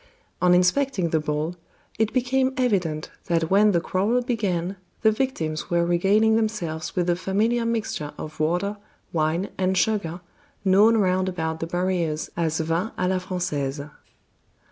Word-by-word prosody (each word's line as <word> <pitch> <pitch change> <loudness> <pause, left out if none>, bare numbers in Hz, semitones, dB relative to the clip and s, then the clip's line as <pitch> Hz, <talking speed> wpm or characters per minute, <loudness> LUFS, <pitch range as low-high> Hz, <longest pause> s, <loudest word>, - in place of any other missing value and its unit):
On 180 0 +5
inspecting 185 +1 +2
the 160 - +2
bowl, 150 +3 -2 0.4
it 220 -1 +2
became 260 +1 +1
evident 180 -11 0 0.2
that 165 -1 0
when 210 +2 +5
the 175 - +2
quarrel 205 +9 0
began 195 -6 -1 0.3
the 220 - +6
victims 190 - -2
were 170 0 +2
regaling 200 +6 +3
themselves 175 -8 -2
with 180 - +1
the 175 0 +2
familiar 215 +6 0
mixture 215 -10 -2
of 155 0 -8
water, 180 +6 0 0.4
wine, 165 +4 0
and 190 0 +1
sugar, 180 -4 0 0.5
known 205 +4 +5
round 185 -2 +2
about 160 -3 -3
the 165 - -3
barrieres 175 -3 -1
as 160 -2 0
vin 165 +6 0
a 180 - 0
la 185 0 +1
Frangaise. 150 -6 -3
180 Hz, 145 wpm, -24 LUFS, 165-215 Hz, 0.5 s, the